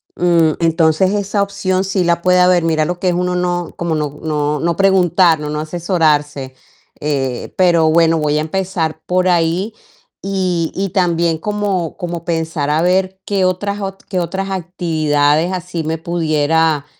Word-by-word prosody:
mm, 170 -2 +3
entonces 165 +2 +2
esa 205 0 -1
opción 195 -2 -1
sí 190 -1 0
la 170 0 +1
puede 180 +1 +3
haber. 180 -1 +4
Mira 160 -2 +1
lo 175 +2 -3
que 185 - -1
es 175 - 0
uno 180 0 -1
no 175 -1 -2
como 170 -2 -2
no 150 -1 -3
no 150 -1 -1
no 170 +3 0
preguntar, 180 -4 +3
no 150 0 -5
no 150 0 -3
asesorarse, 155 -5 0 0.5
eh, 135 -4 -3
pero 170 -3 +4
bueno, 165 0 +3
voy 150 0 0
a - - +1
empezar 170 -1 -2
por 185 0 +1
ahí, 175 +5 +1 0.5
y 185 -4 -1
y 195 +1 -1
también 170 -3 +1
como 200 -3 -2
como 175 -3 -5
pensar 160 -3 -2
a 155 +2 +2
ver, 185 +1 +1
qué 195 -2 0
otras 200 +3 -1
ot 195 0 -6
qué 185 -2 -2
otras 195 +3 -3
actividades 160 -3 0
así 180 -2 -4
me 160 +1 -2
pudiera, 160 -2 +1
170 Hz, 165 wpm, -17 LUFS, 160-185 Hz, 0.5 s, haber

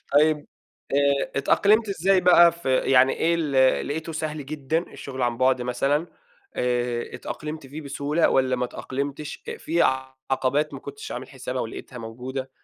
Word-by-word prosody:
طيّب، 150 +1 +3 0.5
آآ 140 0 +2
اتأقلمت 205 +10 +3
إزاي 190 0 +2
بقى 175 -1 +7
ف 170 +1 -15
يعني 130 0 +4
إيه، 170 +1 +1
ال 135 -5 +2
لقيته 160 +3 -4
سهل 155 -2 -4
جدًا؟ 150 +1 -1
الشغل 130 -2 -6
عن 120 -1 +1
بُعد 130 0 +3
مثلًا، 135 +6 0 0.5
آآ، 120 -1 -1
اتأقلمت 155 -1 -6
فيه 145 +4 -8
بسهولة، 145 +2 0
والّا 130 -1 +2
ما 125 - -1
اتأقلمتش 140 +4 -5
أ - - -4
في 170 +2 0 0.5
عقبات 140 +3 +1
ما - - -7
كنتش 425 +1 -8
عامل - - -6
حسابها، - - -5
ولقيتها 260 - -8
موجودة. 125 +4 -6
140 Hz, 150 wpm, -24 LUFS, 130-160 Hz, 0.5 s, بقى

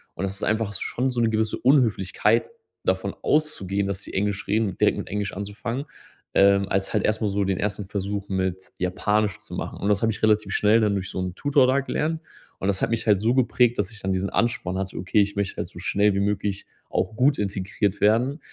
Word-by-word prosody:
Und - - -4
das 95 0 -3
ist 100 - -7
einfach 110 -1 0
schon 125 +6 -2
so 125 - -3
'ne 115 - +3
gewisse 110 -1 0
Unhöflichkeit, 115 -5 +3 0.4
davon - - 0
auszugehen, 100 -11 0
dass 100 -1 -3
die - - -10
Englisch 100 0 -1
reden 105 -3 0
direkt - - +3
mit - - -5
Englisch 100 0 -2
anzufangen. 110 +7 -4 0.5
Ähm, 100 0 +5
als 95 0 -1
halt - - +1
erstmal 110 0 +1
so 100 0 0
den 95 -1 -1
ersten 105 0 -2
Versuch 100 +1 -3
mit 95 -1 -2
Japanisch 105 +2 0
zu - - -8
machen. - - -5
Und 100 - -1
das 100 -1 +2
habe 115 0 +2
ich 105 - -8
relativ 110 -1 +3
schnell 105 +2 +4
dann 105 -2 +2
durch 95 0 -3
so - - -4
'n 90 -1 -3
Tutor 140 0 +3
da 135 +2 +3
gelernt. 160 +4 -2 0.4
Und 95 - -2
das 95 -1 -1
hat - - +1
mich 115 0 -1
halt 105 -3 +5
so 115 +4 +2
geprägt, 125 -2 +3
dass 105 +1 0
ich 110 - -7
dann 95 0 -1
diesen 95 +1 -1
Ansporn 100 -6 0
hatte: 95 0 -4
„Okay, 95 +3 +2
ich 100 +1 -1
möchte 100 -1 -2
halt - - -3
so - - -14
schnell 100 0 +2
wie - - +1
möglich 100 -1 -1 0.2
auch 110 - -1
gut 135 +4 +3
integriert 100 0 -1
werden.“ 120 +8 +3
105 Hz, 225 wpm, -24 LUFS, 95-115 Hz, 0.5 s, Ähm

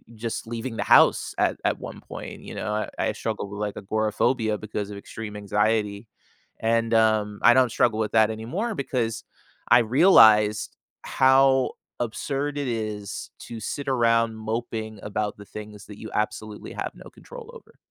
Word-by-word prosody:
just 115 +1 -4
leaving 115 +1 -5
the - - -2
house - - +5
at - - +1
at - - 0
one - - -8
point, - - -9
you - - -9
know, 105 - -3
I 105 0 -2 0.2
I - - +1
struggled 100 - -4
with 100 - -7
like 105 -1 -3
agoraphobia 110 +2 0
because 105 -1 -5
of 100 - -7
extreme 105 +1 -8
anxiety, 105 +1 0 0.5
and, 115 0 +1
um, 110 -2 +2
I 120 - +8
don't 130 0 +4
struggle 110 -1 +2
with 110 -1 -1
that 110 -1 +4
anymore 170 - -3
because 120 - -2 0.5
I 120 - +8
realized 110 - +5 0.3
how 130 0 +4 0.3
absurd 140 +5 -3
it 140 -2 -2
is 110 -4 -4
to 115 - -8
sit 140 +6 -5
around 115 -3 +2
moping 110 -1 -4
about 105 0 -3
the 105 - -12
things 105 0 -10
that 105 - -11
you 110 - -8
absolutely 105 0 -3
have - - -4
no - - -12
control 475 -2 -12
over. 470 - -15
110 Hz, 165 wpm, -25 LUFS, 105-120 Hz, 0.5 s, I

